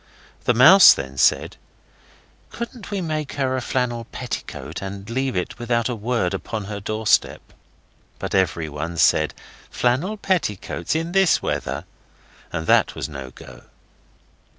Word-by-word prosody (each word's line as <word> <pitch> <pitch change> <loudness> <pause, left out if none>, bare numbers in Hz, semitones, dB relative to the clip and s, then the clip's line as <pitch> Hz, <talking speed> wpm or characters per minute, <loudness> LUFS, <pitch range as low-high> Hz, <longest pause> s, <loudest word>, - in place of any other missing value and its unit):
The 125 - +3
Mouse 170 +11 +9
then 70 0 -6
said, - - +2 0.9
'Couldn't 235 -3 -7
we 200 -2 -2
make 155 -3 -3
her 135 -2 -1
a 130 - -2
flannel 120 -2 -2
petticoat 75 -3 -6
and 100 +1 -7
leave 130 +1 -2
it 90 +6 -3
without 120 0 0
a 125 - -2
word 115 -4 -1
upon 110 -3 -4
her 100 +1 -6
doorstep?' 110 +2 0 0.6
But - - -5
everyone 80 -3 -1
said, 80 -1 +3 0.3
'Flannel 140 - 0
petticoats 130 - -2
in 165 +1 -2
this 195 -2 +3
weather?' - - -3 0.7
so 85 -2 -3
that - - +3
was - - -4
no 70 -3 -7
go. - - -14
115 Hz, 135 wpm, -22 LUFS, 90-145 Hz, 0.9 s, Mouse